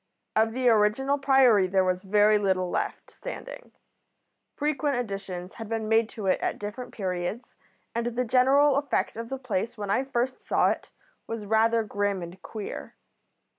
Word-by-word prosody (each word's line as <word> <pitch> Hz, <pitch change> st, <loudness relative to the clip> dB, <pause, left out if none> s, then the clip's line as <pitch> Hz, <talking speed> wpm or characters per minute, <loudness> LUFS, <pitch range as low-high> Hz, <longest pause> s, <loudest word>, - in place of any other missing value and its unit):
Of 225 Hz, +1 st, +3 dB
the 255 Hz, 0 st, 0 dB
original 235 Hz, +6 st, +3 dB
Priory 265 Hz, -8 st, +5 dB
there 190 Hz, 0 st, +2 dB
was 185 Hz, 0 st, 0 dB
very 210 Hz, +2 st, +4 dB
little 185 Hz, -3 st, 0 dB
left -, -, -3 dB
standing. -, -, -8 dB, 0.8 s
Frequent 290 Hz, -2 st, 0 dB
additions 195 Hz, -5 st, -5 dB
had 225 Hz, -2 st, -8 dB
been 225 Hz, -1 st, -2 dB
made 225 Hz, 0 st, +3 dB
to 215 Hz, -, -7 dB
it 190 Hz, -, +2 dB
at -, -, -1 dB
different 210 Hz, +5 st, -6 dB
periods, 190 Hz, +4 st, -4 dB, 0.4 s
and 235 Hz, +1 st, -1 dB
the 240 Hz, +1 st, -1 dB
general 270 Hz, +4 st, +4 dB
effect 285 Hz, 0 st, 0 dB
of 230 Hz, +1 st, -6 dB
the 270 Hz, -, -3 dB
place 230 Hz, -3 st, -3 dB
when 205 Hz, -1 st, -3 dB
I 255 Hz, -, +2 dB
first 260 Hz, -1 st, -2 dB
saw -, -, +3 dB
it -, -, -5 dB, 0.4 s
was 225 Hz, -2 st, -5 dB
rather 225 Hz, +2 st, +3 dB
grim 205 Hz, -3 st, -1 dB
and 175 Hz, +3 st, -10 dB
queer. 215 Hz, -3 st, -7 dB
225 Hz, 165 wpm, -27 LUFS, 200-255 Hz, 0.8 s, Priory